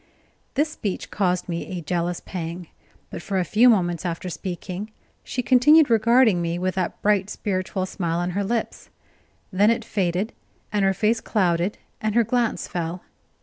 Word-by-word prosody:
This 300 Hz, +3 st, +1 dB
speech 205 Hz, -10 st, -4 dB
caused 180 Hz, -3 st, 0 dB
me 175 Hz, +1 st, -4 dB
a -, -, -4 dB
jealous 175 Hz, +2 st, -2 dB
pang. 170 Hz, -1 st, -6 dB, 0.4 s
But -, -, -6 dB
for 195 Hz, +2 st, -2 dB
a 180 Hz, -, +1 dB
few 235 Hz, +7 st, +5 dB
moments 175 Hz, -7 st, +2 dB
after 175 Hz, +1 st, -3 dB
speaking, 185 Hz, +4 st, -5 dB, 0.3 s
she 250 Hz, -, -3 dB
continued 275 Hz, +3 st, +6 dB
regarding 225 Hz, -3 st, +4 dB
me 170 Hz, 0 st, -1 dB
with 185 Hz, +1 st, -1 dB
that 185 Hz, -2 st, -2 dB
bright, 205 Hz, -1 st, +2 dB
spiritual 185 Hz, -2 st, -2 dB
smile 170 Hz, -3 st, -2 dB
on 175 Hz, +1 st, -1 dB
her 200 Hz, +3 st, -1 dB
lips; 230 Hz, +3 st, -3 dB, 0.6 s
then 205 Hz, +3 st, +4 dB
it 230 Hz, -1 st, 0 dB
faded, 195 Hz, 0 st, -1 dB, 0.4 s
and 205 Hz, -1 st, +2 dB
her 195 Hz, 0 st, +2 dB
face 225 Hz, +4 st, +1 dB
clouded 180 Hz, -1 st, 0 dB, 0.2 s
and 215 Hz, 0 st, -1 dB
her 235 Hz, -, +5 dB
glance 240 Hz, +1 st, 0 dB
fell. 175 Hz, +1 st, -4 dB
190 Hz, 165 wpm, -23 LUFS, 175-220 Hz, 0.6 s, continued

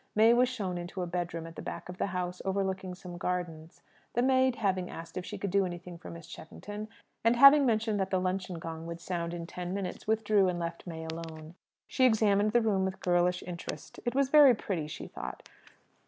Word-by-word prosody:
May 220 Hz, +2 st, +6 dB
was 245 Hz, +1 st, +4 dB
shown 190 Hz, -8 st, -3 dB
into 175 Hz, +2 st, -5 dB
a -, -, -1 dB
bedroom 170 Hz, -2 st, -3 dB
at 165 Hz, 0 st, -10 dB
the -, -, -6 dB
back -, -, -6 dB
of 180 Hz, 0 st, -9 dB
the -, -, +1 dB
house, 180 Hz, -1 st, -3 dB
overlooking 190 Hz, -1 st, -2 dB
some 180 Hz, -1 st, -9 dB
gardens. 170 Hz, -3 st, -4 dB, 0.3 s
The 240 Hz, -, +2 dB
maid, 260 Hz, -1 st, +4 dB
having 190 Hz, -5 st, 0 dB
asked 165 Hz, 0 st, -9 dB
if 185 Hz, -, -3 dB
she 210 Hz, -, -5 dB
could 195 Hz, -1 st, -3 dB
do 200 Hz, +1 st, +4 dB
anything 175 Hz, -1 st, -6 dB
for -, -, -9 dB
Miss 170 Hz, -1 st, -9 dB
Cheffington, 205 Hz, +7 st, -8 dB, 0.4 s
and 230 Hz, +1 st, +4 dB
having 275 Hz, +2 st, +8 dB
mentioned 220 Hz, -2 st, +1 dB
that 190 Hz, 0 st, 0 dB
the 185 Hz, -, +1 dB
luncheon 185 Hz, -1 st, -2 dB
gong 165 Hz, 0 st, -6 dB
would 170 Hz, 0 st, -6 dB
sound 170 Hz, -1 st, -3 dB
in 170 Hz, -1 st, -5 dB
ten 180 Hz, +2 st, -5 dB
minutes, 195 Hz, -1 st, -5 dB
withdrew, 215 Hz, -3 st, +3 dB
and 175 Hz, -, -2 dB
left 170 Hz, +1 st, -5 dB
May 160 Hz, -1 st, -6 dB
alone. 160 Hz, -1 st, -7 dB, 0.3 s
She 260 Hz, -, +3 dB
examined 215 Hz, -3 st, +4 dB
the 240 Hz, +2 st, +4 dB
room 200 Hz, -4 st, +2 dB
with 190 Hz, 0 st, -2 dB
girlish 180 Hz, 0 st, +2 dB
interest. 175 Hz, -1 st, -7 dB
It 240 Hz, -, -2 dB
was 275 Hz, -1 st, +3 dB
very 285 Hz, -4 st, +8 dB
pretty, 175 Hz, -7 st, -3 dB
she 150 Hz, -, -7 dB
thought. -, -, -7 dB
185 Hz, 215 wpm, -30 LUFS, 175-215 Hz, 0.4 s, having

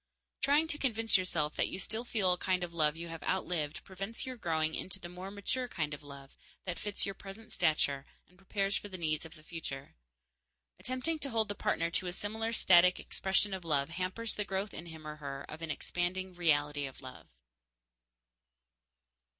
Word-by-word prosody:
Trying 290 Hz, +3 st, +5 dB
to 300 Hz, -2 st, -1 dB
convince 225 Hz, -4 st, +2 dB
yourself 165 Hz, -5 st, +2 dB
that -, -, +3 dB
you -, -, -3 dB
still 220 Hz, +4 st, 0 dB
feel 205 Hz, -7 st, +3 dB
a -, -, -1 dB
kind 185 Hz, -1 st, +2 dB
of 170 Hz, -1 st, -4 dB
love 155 Hz, -2 st, +3 dB
you 170 Hz, 0 st, -5 dB
have 165 Hz, -1 st, -6 dB
outlived 170 Hz, -5 st, 0 dB
prevents 195 Hz, +4 st, -3 dB
your 260 Hz, -1 st, -4 dB
growing 160 Hz, -7 st, +1 dB
into 190 Hz, +3 st, -2 dB
the 175 Hz, -, -7 dB
more 180 Hz, +2 st, -6 dB
mature 205 Hz, +6 st, -1 dB
kind 155 Hz, -9 st, -2 dB
of 145 Hz, -, -6 dB
love 140 Hz, -1 st, -11 dB, 0.3 s
that 180 Hz, -2 st, -2 dB
fits 205 Hz, -1 st, 0 dB
your 195 Hz, -, -2 dB
present 195 Hz, +3 st, -8 dB
stature 150 Hz, -5 st, +2 dB, 0.2 s
and 180 Hz, -, -23 dB
prepares 195 Hz, +1 st, 0 dB
for 205 Hz, -, -2 dB
the 185 Hz, -, -5 dB
needs 155 Hz, -1 st, 0 dB
of 160 Hz, -, -15 dB
the 155 Hz, -, -14 dB
future. 155 Hz, -5 st, -6 dB, 0.9 s
Attempting 255 Hz, +6 st, -1 dB
to 280 Hz, -, -1 dB
hold 225 Hz, -3 st, +1 dB
the -, -, 0 dB
partner 170 Hz, -4 st, +1 dB
to 185 Hz, -, +1 dB
a 175 Hz, -, -2 dB
similar 220 Hz, +4 st, -2 dB
static 180 Hz, -4 st, +6 dB
expression 195 Hz, +1 st, +1 dB
of 190 Hz, -2 st, -3 dB
love 145 Hz, -3 st, +2 dB
hampers 185 Hz, +7 st, -1 dB
the 210 Hz, -, +2 dB
growth 195 Hz, +1 st, -2 dB
in 170 Hz, -, -7 dB
him 160 Hz, -2 st, -9 dB
or 150 Hz, 0 st, -5 dB
her 140 Hz, -2 st, -5 dB
of 155 Hz, +1 st, -7 dB
an 165 Hz, -, -4 dB
expanding 180 Hz, +4 st, -1 dB
reality 145 Hz, -4 st, +2 dB
of 135 Hz, +1 st, -11 dB
love. 130 Hz, -1 st, -9 dB
180 Hz, 195 wpm, -33 LUFS, 155-205 Hz, 0.9 s, static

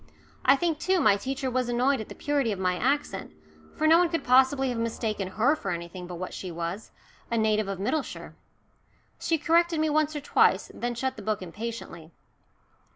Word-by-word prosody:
I 270 Hz, -, +6 dB
think, 320 Hz, +1 st, -1 dB
too, 375 Hz, +2 st, +2 dB
my 215 Hz, -10 st, +5 dB
teacher 265 Hz, +4 st, -3 dB
was 250 Hz, -1 st, 0 dB
annoyed 250 Hz, +1 st, +2 dB
at 220 Hz, -, -9 dB
the -, -, -9 dB
purity 285 Hz, -6 st, 0 dB
of 200 Hz, -, -3 dB
my 185 Hz, -1 st, 0 dB
accent, 250 Hz, -, -1 dB, 0.4 s
for 310 Hz, -, -1 dB
no 325 Hz, +2 st, +7 dB
one 350 Hz, -1 st, +3 dB
could 330 Hz, 0 st, -2 dB
possibly 265 Hz, +1 st, +4 dB
have 240 Hz, -2 st, -2 dB
mistaken 220 Hz, -3 st, -2 dB
her 225 Hz, +10 st, +2 dB
for 200 Hz, -, -5 dB
anything 175 Hz, +1 st, -5 dB
but 180 Hz, -, -7 dB
what 185 Hz, +2 st, -6 dB
she 185 Hz, -, -6 dB
was 170 Hz, +5 st, -5 dB, 0.4 s
a 235 Hz, -, 0 dB
native 215 Hz, -1 st, +2 dB
of 195 Hz, -1 st, -3 dB
Middleshire. 255 Hz, -, -3 dB, 0.9 s
She 330 Hz, -, +1 dB
corrected 335 Hz, +1 st, +2 dB
me 310 Hz, 0 st, +1 dB
once 310 Hz, 0 st, +1 dB
or 295 Hz, -, -3 dB
twice, 290 Hz, -, +2 dB
then 240 Hz, 0 st, -3 dB
shut 260 Hz, +2 st, -2 dB
the -, -, -7 dB
book 210 Hz, -1 st, -2 dB
impatiently. 185 Hz, -4 st, -7 dB
240 Hz, 195 wpm, -27 LUFS, 195-290 Hz, 0.9 s, no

